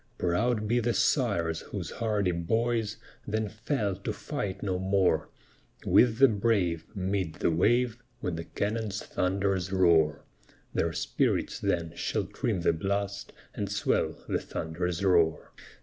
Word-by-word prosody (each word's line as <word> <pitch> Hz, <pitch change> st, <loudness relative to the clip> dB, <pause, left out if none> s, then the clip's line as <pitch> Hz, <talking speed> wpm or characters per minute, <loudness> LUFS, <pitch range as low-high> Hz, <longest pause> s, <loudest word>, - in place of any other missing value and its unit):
Proud 105 Hz, +5 st, +1 dB
be 120 Hz, +3 st, +2 dB
the 120 Hz, 0 st, 0 dB
sires, 85 Hz, -, +1 dB
whose -, -, -6 dB
hardy 105 Hz, -5 st, 0 dB
boys 110 Hz, +5 st, 0 dB, 0.3 s
Then 110 Hz, 0 st, -1 dB
fell 110 Hz, -2 st, -1 dB
to 100 Hz, -, -3 dB
fight 95 Hz, -2 st, -4 dB
no 95 Hz, -3 st, -1 dB
more: 95 Hz, -5 st, +2 dB, 0.6 s
With 115 Hz, -2 st, +5 dB
the 135 Hz, +2 st, +8 dB
brave, 100 Hz, -7 st, +1 dB
mid 95 Hz, -4 st, -1 dB
the -, -, +1 dB
wave; 120 Hz, +8 st, +2 dB, 0.2 s
When 90 Hz, -6 st, -2 dB
the 85 Hz, 0 st, -5 dB
cannon's 105 Hz, -1 st, -2 dB
thunders 95 Hz, 0 st, 0 dB
roar, 85 Hz, -6 st, +3 dB, 0.5 s
Their -, -, +1 dB
spirits -, -, 0 dB
then 85 Hz, -2 st, -1 dB
shall -, -, -1 dB
trim 100 Hz, -7 st, -2 dB
the 85 Hz, -, +3 dB
blast, 100 Hz, +4 st, -2 dB, 0.2 s
And 100 Hz, -1 st, -3 dB
swell 100 Hz, 0 st, 0 dB
the -, -, 0 dB
thunder's 90 Hz, +3 st, -3 dB
roar. 85 Hz, -4 st, +3 dB
100 Hz, 135 wpm, -29 LUFS, 85-110 Hz, 0.6 s, the